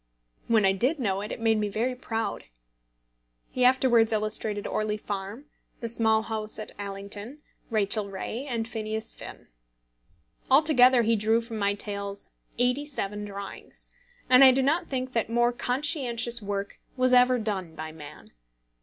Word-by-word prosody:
When 220 -3 +3
I 190 - +5
did 250 - +1
know 200 -7 -1
it, 210 - -6
it - - -5
made 225 -1 +2
me 210 -1 -1
very 235 +5 -1
proud. 225 -3 -4 1.1
He 255 - 0
afterwards 250 -3 +4
illustrated 215 -1 -1
Orley 215 0 -1
Farm, 205 +5 -6 0.3
The 230 - -4
Small 220 -1 +2
House 220 -1 -4
at 215 - -6
Allington, 205 +7 -7 0.3
Rachel 210 -2 0
Ray, 220 +7 -5
and 230 -3 -2
Phineas 220 0 -4
Finn. - - -10 1.0
Altogether 260 -4 +6
he 230 +1 +3
drew 220 +2 +2
from 230 -1 -6
my 200 0 +1
tales 200 -1 -4 0.3
eighty 250 +4 +1
seven 210 -7 -4
drawings, 200 -1 -8 0.4
and 255 +1 +7
I 265 - +10
do 265 +1 +1
not 325 +6 +1
think 255 -1 -3
that 230 -1 0
more 240 +1 +2
conscientious 245 -3 0
work 200 0 -4 0.2
was 255 0 +3
ever 250 0 +5
done 195 -7 -3
by 155 0 -6
man. 150 -2 -12
225 Hz, 155 wpm, -27 LUFS, 205-250 Hz, 1.1 s, I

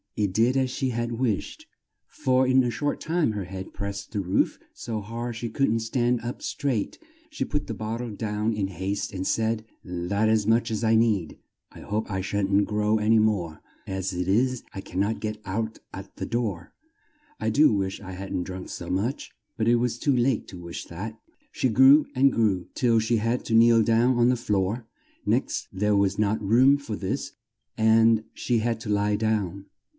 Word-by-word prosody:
It 100 -3 0
did 120 +5 +3
as 130 -1 +1
she 130 0 -1
had 120 0 -2
wished, 125 - -2 0.4
for 130 -1 +1
in 130 0 +4
a 120 - 0
short 145 +5 -2
time 165 -6 0
her 105 -3 -4
head 95 +1 -7
pressed 100 0 -6
the 105 - -2
roof 95 -1 0
so 110 -2 -4
hard 115 +3 -5
she 115 0 -4
couldn't 115 -1 +1
stand 120 +1 0
up 120 +1 -5
straight. 135 -8 -2 0.3
She 305 - -3
put 150 -1 -3
the 115 - -3
bot 110 +2 -4
tle 120 -1 -4
down 105 +1 -2
in 105 -2 -1
haste 95 +2 -3
and 95 0 -4
said, 110 +1 0 0.2
"That's 90 +4 0
as 110 -2 +2
much 115 +1 +3
as 110 0 -2
I 110 0 +4
need 110 -8 +1 0.3
I - - -12
hope 110 +2 -3
I 95 -2 -2
shan't 100 +1 +1
grow 105 +1 +1
an 105 +1 +1
y 110 - +6
more 100 -7 0 0.3
as 95 0 -2
it 90 0 -3
is, 125 +5 +1
I 95 - -5
can't 100 +3 -2
get 110 -1 -4
out 110 +4 -3
at - - -9
the - - -3
door 110 -8 -3 0.7
I - - 0
do 150 -1 +5
wish 95 -2 -1
I 95 -2 -8
hadn't 95 -1 -4
drunk 95 0 -7
so 85 - -7
much!" 110 +10 -2 0.2
But 110 -2 -1
it 120 - +5
was 120 0 0
too 140 -3 +2
late 125 0 +1
to 95 - -9
wish 85 -1 -7
that! 110 +6 -7 0.3
She 130 - 0
grew 135 +6 +6
and 135 +1 +5
grew, 105 -7 +1
till 115 -3 +3
she 115 +1 +1
had 115 +3 -1
to 115 - -2
kneel 115 0 +6
down 120 +3 +3
on 120 0 +4
the 125 - +3
floor; 105 0 -1 0.4
next - - 0
there 105 +2 +1
was 100 0 +1
not 105 +1 +1
room 125 +7 +5
for 130 -7 -5
this 95 -2 -3 0.5
and 110 0 +4
she 120 - 0
had 115 0 -1
to 110 - -6
lie 105 0 +2
down. 105 -3 -1
110 Hz, 200 wpm, -26 LUFS, 100-120 Hz, 0.7 s, y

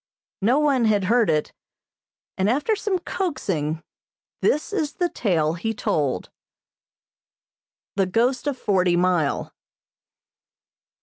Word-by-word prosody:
No 235 +7 +3
one 280 -5 +3
had 210 -3 +3
heard 225 +1 +3
it, 155 -1 0 0.8
and, 190 +2 +1
after 295 - +1
some 405 -2 -1
coaxing, 190 - -2 0.6
this 300 +7 +1
is 310 -7 -1
the 355 -1 0
tale 165 - +1
he 225 +6 -3
told. 140 - -1 1.6
The 195 -1 +2
Ghost 240 +7 +1
of 280 -3 -1
Forty 185 -6 +2
Mile. 175 -4 +1
215 Hz, 110 wpm, -23 LUFS, 175-285 Hz, 1.6 s, No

